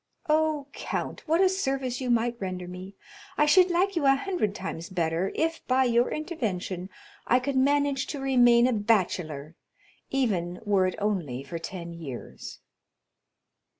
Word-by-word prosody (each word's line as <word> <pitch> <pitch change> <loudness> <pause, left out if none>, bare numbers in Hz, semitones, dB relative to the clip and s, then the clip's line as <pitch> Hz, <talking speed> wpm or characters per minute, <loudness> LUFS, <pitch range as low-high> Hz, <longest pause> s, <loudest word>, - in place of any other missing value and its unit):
"Oh, 310 -2 +2
count, - - -4
what 325 +4 +3
a 380 - +6
service 270 -9 -1
you 255 - -2
might 235 0 +2
render 185 -1 -4
me! 185 +2 -9 0.4
I 300 - +4
should 365 +5 +6
like 370 +3 +1
you 305 -5 +2
a 270 - +6
hundred 275 - -2
times 170 -2 -5
better 170 +1 -1
if, 325 +1 -1
by 260 +1 +3
your 240 -1 +2
intervention, 200 - -3 0.4
I 250 - +4
could 270 +2 -3
manage 280 0 +2
to 290 - -5
remain 245 -3 +5
a 255 - +2
bachelor, 180 -9 0 0.6
even 190 -10 -1
were 195 -3 +3
it 185 - -3
only 175 -12 -2
for 165 +4 -6
ten 170 0 -7
years." 150 -7 -8
235 Hz, 150 wpm, -27 LUFS, 180-280 Hz, 0.6 s, a